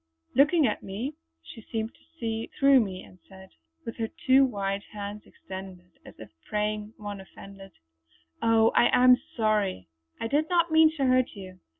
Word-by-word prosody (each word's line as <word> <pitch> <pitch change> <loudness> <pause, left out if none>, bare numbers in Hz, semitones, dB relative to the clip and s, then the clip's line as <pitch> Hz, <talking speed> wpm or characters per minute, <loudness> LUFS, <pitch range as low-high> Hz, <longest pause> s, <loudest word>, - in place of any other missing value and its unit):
Looking 295 +4 +4
at 215 - -1
me, 220 +10 -5 0.3
she 225 - -12
seemed 220 +1 -4
to - - -26 0.2
see 225 -1 -3
through 275 -1 +6
me 190 -5 -3
and 185 - -17
said 190 0 -14 0.3
"With 230 - -6
her 225 -1 -2 0.2
two 265 +1 +6
white 200 -5 -2
hands 205 0 -7
extended, 185 -1 -10
as - - -14
if 110 - -12 0.2
praying 210 +1 -2
one 205 -2 -7
offended:" 195 0 -13 0.7
"Oh, 225 0 +4
I - - +4
am 250 0 +7 0.2
sorry! 210 - 0 0.3
I - - -3
did 295 +5 0
not 340 -2 +2
mean 315 0 +6
to 275 - +1
hurt 255 -2 +2
you. 185 -2 -11
215 Hz, 170 wpm, -27 LUFS, 195-255 Hz, 0.7 s, am